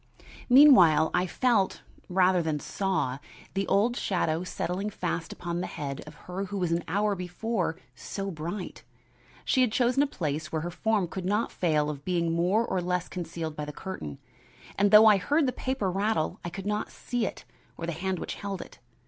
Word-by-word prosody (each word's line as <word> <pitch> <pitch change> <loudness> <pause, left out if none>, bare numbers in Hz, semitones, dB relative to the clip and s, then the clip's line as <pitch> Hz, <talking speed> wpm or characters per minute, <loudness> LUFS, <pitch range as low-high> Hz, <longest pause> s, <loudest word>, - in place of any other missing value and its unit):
Meanwhile 185 - +7
I 180 +1 +2
felt, 225 -3 +1 0.3
rather 185 0 +3
than 155 -2 -1
saw, 165 -7 -1 0.3
the 195 0 -1
old 215 +5 +2
shadow 175 -7 0
settling 185 +3 -3
fast 175 -4 -3
upon 175 0 -4
the - - -3
head 140 -1 -5
of 155 - -11
her 185 +2 -4
who 195 -1 -3
an 170 0 0
hour 205 +5 +1
before 180 +1 -2
had - - -24
been - - -24
so 195 - -5
bright. 170 +4 -6 0.6
She 260 - +3
had 250 -3 +3
chosen 245 +3 +2
a 290 - +3
place 155 - -3
where 160 -1 -2
her 175 - -3
form 205 +1 0
could 185 +2 -6
not 210 +4 0
fail 155 -4 +1
of 145 -2 -5
being 170 -1 0
more 180 +7 +2
or 185 - -1
less 180 0 -1
concealed 165 -3 -5
by 150 - -4
the 150 - -6
curtain, 145 - -7 0.6
and 205 +1 +3
though 210 +2 +9
I 215 -2 +7
heard 290 - +2
the 255 - +1
paper 255 -7 -1
rattle 200 -2 0
I 175 - -3
could 190 +3 -7
not 210 +1 -1
see 245 -4 -2
it - - -8 0.3
or 165 - -4
the 170 - -2
hand 185 +3 -2
which - - -4
held 200 -2 -5
it. - - -17
185 Hz, 195 wpm, -28 LUFS, 165-210 Hz, 0.6 s, though